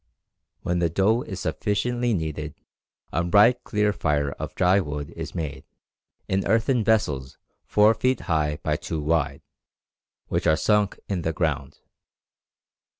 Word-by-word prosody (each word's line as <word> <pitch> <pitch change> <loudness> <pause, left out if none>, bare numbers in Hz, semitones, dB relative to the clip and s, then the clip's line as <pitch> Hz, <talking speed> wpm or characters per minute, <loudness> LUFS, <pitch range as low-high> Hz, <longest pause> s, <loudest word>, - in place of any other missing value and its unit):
When 90 0 0
the 85 -1 +2
dough 100 +8 +2
is 95 -6 -6
sufficiently 120 +2 0
kneaded 80 -3 -4 0.6
a 85 - +1
bright 105 +8 +4
clear 105 -1 +1
fire 75 -5 0
of - - -7
dry 95 +2 +4
wood 75 -4 -4
is - - -7
made, 75 -5 -4 0.6
in 95 +1 0
earthen 115 +1 +2
vessels 75 -13 0 0.3
four 105 +1 +5
feet 125 +4 0
high 75 -3 0
by - - 0
two 80 - -4
wide, 75 -2 0 0.8
which - - -1
are 80 - +4
sunk 105 0 +2
in 95 -4 -2
the 80 0 -1
ground. 75 -4 -2
85 Hz, 140 wpm, -25 LUFS, 75-105 Hz, 0.8 s, four